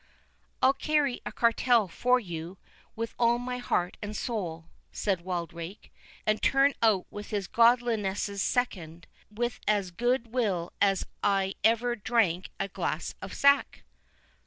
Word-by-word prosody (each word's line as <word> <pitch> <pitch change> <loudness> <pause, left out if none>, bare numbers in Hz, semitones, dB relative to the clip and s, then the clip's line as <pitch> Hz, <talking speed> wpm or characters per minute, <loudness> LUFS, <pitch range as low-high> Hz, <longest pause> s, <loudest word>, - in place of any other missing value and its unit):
"I'll 265 - +6
carry 285 -2 0
a - - -4
cartel 235 -2 +3
for 250 +8 +2
you, 175 -3 -7 0.4
with 230 0 -4
all 235 0 +4
my 250 +1 -4
heart 180 -7 -1
and 210 0 -5
soul," 175 -9 -4 0.3
said 195 -4 -1
Wildrake; 170 +1 -6 0.3
"and 215 0 +1
turn 275 +1 +4
out 215 -5 +3
with 205 0 -8
his 205 -2 -2
godliness's 220 -3 +2
second, 175 -10 -2 0.2
with 240 +3 -3
as 200 -3 +1
good 240 +4 -1
will 195 -9 -1
as 195 -1 +3 0.2
I 195 -1 +1
ever 235 +2 +3
drank 200 -6 +1
a - - -1
glass 195 - -3
of - - -7
sack." 280 0 +3
215 Hz, 135 wpm, -28 LUFS, 190-240 Hz, 0.4 s, I'll